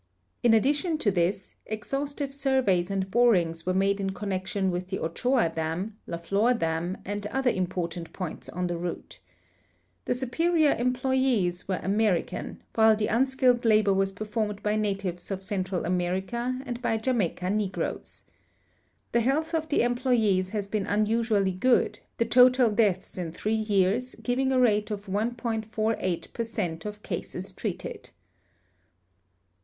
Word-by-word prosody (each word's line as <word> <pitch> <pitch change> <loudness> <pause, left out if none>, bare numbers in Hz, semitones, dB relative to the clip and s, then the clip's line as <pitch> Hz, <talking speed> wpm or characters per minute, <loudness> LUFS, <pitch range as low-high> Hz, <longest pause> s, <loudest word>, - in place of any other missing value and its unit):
In 235 -2 +5
addition 295 - +2
to 215 -9 +1
this, 185 +1 -1
exhaustive 275 +6 -3
surveys 260 -10 +1
and 190 -1 -2
borings 180 -9 +3
Avere 185 +2 -1
made 195 +1 +2
in 195 -1 -1
connection 190 0 -1
Avith 180 +1 -3
the 190 0 -3
Ochoa 235 +4 +1
dam, 165 +6 -3
I^a 170 - -3
Flor 205 +8 +2
dam, 165 -1 -1
and 205 +1 -3
other 265 +2 +1
important 175 -2 -3
i)oints 180 -4 -6
on 180 +1 -2
the 175 -1 -2
route. 175 0 -6 0.9
The 245 - 0
superior 310 +5 +2
employes 250 -7 +1
Avere 190 -1 -2
American, 200 -2 0
Avhile 220 -1 +5
the 210 - 0
unskilled 255 0 +3
labor 215 -3 +4
Avas 195 0 +1
performed 210 -1 -3
by 210 0 +1
natives 195 -4 -2
of 195 -1 -4
Central 190 -2 -2
America 190 +8 -1
and 245 -1 -5
by 225 -2 +1
Jamaica 215 -6 0
negroes. 205 -2 -3 0.9
The 235 - +3
health 300 +7 0
of 320 -1 -1
the 290 - +3
emploves 240 -7 +2
has 205 0 -2
been 200 0 -2
unusually 215 -1 +2
good, 240 +7 +2 0.2
the 230 - +2
total 250 0 +5
deaths 205 -4 0
in 170 -3 -3
three 210 +6 -2
years 215 +3 +1
giving 260 +2 0
a 260 - +3
rate 215 -3 +3
of 205 -1 -4
1.48 220 -2 -2
per 230 - -2
cent 185 -8 -4
of 210 0 -6
cases 185 +1 -5
treated. 185 -1 -5
210 Hz, 145 wpm, -27 LUFS, 185-245 Hz, 0.9 s, In